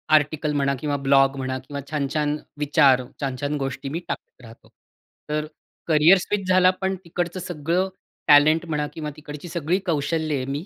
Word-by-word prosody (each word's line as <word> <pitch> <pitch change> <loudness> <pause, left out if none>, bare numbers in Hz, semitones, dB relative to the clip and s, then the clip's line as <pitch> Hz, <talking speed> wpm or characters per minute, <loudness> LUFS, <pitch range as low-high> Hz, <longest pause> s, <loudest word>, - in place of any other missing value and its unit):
Article 150 0 +1
म्हणा 140 -1 +1
किंवा 145 0 -1
blog 135 0 +5
म्हणा 130 0 -2
किंवा 140 -1 -5
छान-छान 150 0 -1 0.2
विचार, 140 -3 +4 0.2
छान-छान 140 +2 -2
गोष्टी 135 0 -4
मी 160 +5 -3
टाकत - - -7
राहतो. 115 0 -15 0.6
तर 150 0 -1 0.4
करिअर 160 +4 +6
स्विच 195 0 -2
झाला. 185 0 +5
पण 190 0 0
तिकडचं 175 +1 -3
सगळं 175 +2 -1 0.4
टॅलेंट 155 +3 +6
म्हणा 150 -2 -2
किंवा 150 -2 -5
तिकडची 150 +2 -9
सगळी 170 +2 0
कौशल्ये 155 -3 -1
मी 140 +5 -4
150 Hz, 150 wpm, -23 LUFS, 140-165 Hz, 0.6 s, करिअर